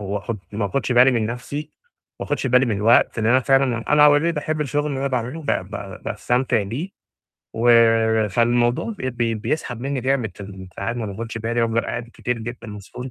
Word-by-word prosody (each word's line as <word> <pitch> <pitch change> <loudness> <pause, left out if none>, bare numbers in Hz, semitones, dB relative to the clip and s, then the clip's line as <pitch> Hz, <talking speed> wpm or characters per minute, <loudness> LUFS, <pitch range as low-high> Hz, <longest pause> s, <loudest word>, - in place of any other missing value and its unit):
وآخُد 105 +2 -4
ما 105 0 -1
آخُدش 125 +6 -1
بالي 125 +2 +6
من 115 -4 0
نَفْسي، 140 +6 -5 0.5
وما - - -5
آخُدش 145 -2 -1
بالي 125 +1 +4
من 110 -4 0
الوقت 115 +3 +3
لأن 110 - 0
أنا 125 +3 +4
فعلًا 130 -3 +1
أنا 150 0 +7
already 150 +3 +3
باحب 155 +1 -2
الشغل 145 0 -1
اللي 140 -3 -3
أنا 140 - -1
باعمله، 125 +5 -3
ب - - -11
ب 100 -3 -4
باستمتع 120 +1 0
بيه 120 - -4 0.7
و 115 -2 +4
فالموضوع 120 - +1
بي 130 - -2
بي 120 -2 -1
بيسحب 120 +2 -3
مني 135 +1 -2
جامد 125 -5 -1
فال 95 -2 -9
ساعات 100 +5 -3
ما 115 -2 -3
باخُدش 115 +3 -6
بالي 115 +1 -1
وافضل 115 0 +1
قاعد 115 0 -5
كتير 125 -1 -3
جدًا 120 +1 -7
مسحول 105 +5 -8
120 Hz, 190 wpm, -22 LUFS, 110-130 Hz, 0.7 s, أنا